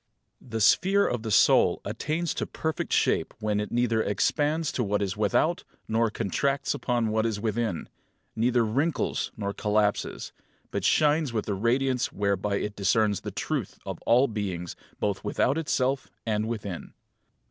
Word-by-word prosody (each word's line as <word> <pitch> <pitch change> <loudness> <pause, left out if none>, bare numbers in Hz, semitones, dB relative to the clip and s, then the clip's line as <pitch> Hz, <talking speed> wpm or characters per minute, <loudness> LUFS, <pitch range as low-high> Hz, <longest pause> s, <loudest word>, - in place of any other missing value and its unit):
12. - - -18
The 110 -1 -2
sphere 195 - +4
of 125 - -2
the 110 - -4
soul 105 - +5
attains 155 +11 -2
to - - -3
perfect 160 -1 -3
shape - - +1
when 105 -1 0
it 105 - -3
neither 120 -2 +2
expands 150 +9 +1
to 125 - -1
what 105 -1 0
is 100 -2 -2
without, 110 - +1 0.2
nor 115 +1 +2
contracts 135 +8 -1
upon 120 -3 0
what 110 0 +1
is 110 -2 -1
within; 110 -4 -2 0.5
neither 120 +1 +2
wrinkles 140 +9 0
nor 100 -2 -3
collapses, 105 0 0 0.4
but - - -2
shines 150 -3 +3
with 110 -2 -2
a 105 - 0
radiance 125 +5 +1
whereby 100 0 0
it 105 +1 -3
discerns 105 0 +2
the - - -5
truth - - -3
of - - -6
all 125 +4 +5
things, 95 -7 -4 0.2
both 100 -2 -1
without 135 - +1
itself 135 -4 0 0.2
and 110 -1 0
within. 105 -6 -5
110 Hz, 160 wpm, -27 LUFS, 105-130 Hz, 0.5 s, soul